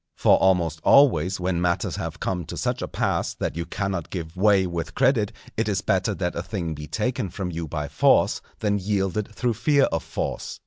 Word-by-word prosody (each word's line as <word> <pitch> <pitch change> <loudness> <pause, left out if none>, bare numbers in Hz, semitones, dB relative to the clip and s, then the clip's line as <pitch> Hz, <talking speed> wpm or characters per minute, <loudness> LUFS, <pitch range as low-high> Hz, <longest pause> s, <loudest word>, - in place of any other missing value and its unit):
For - - +5
almost 85 -4 +2
always 95 - +4
when 90 -1 -1
matters 85 -1 0
have - - -5
come 90 -2 -2
to - - -7
such - - -1
a - - -3
pass - - -1
that - - -3
you 85 0 -4
cannot 95 -5 -3
give 85 -2 -6
way 100 0 +4
with 85 -2 -4
credit 125 -5 +2 0.2
it 110 0 0
is 100 -1 0
better 95 +2 0
that 90 -2 -2
a 85 - -2
thing 85 -3 -4
be 75 0 -8
taken 115 +1 -2
from 90 +1 -4
you 85 -1 -4
by 75 -1 -3
force - - +3 0.2
than 100 -1 +1
yielded 100 +1 -1
through 120 +2 -1
fear 140 +6 +3
of 80 - 0
force. - - -4
95 Hz, 200 wpm, -24 LUFS, 85-105 Hz, 0.2 s, For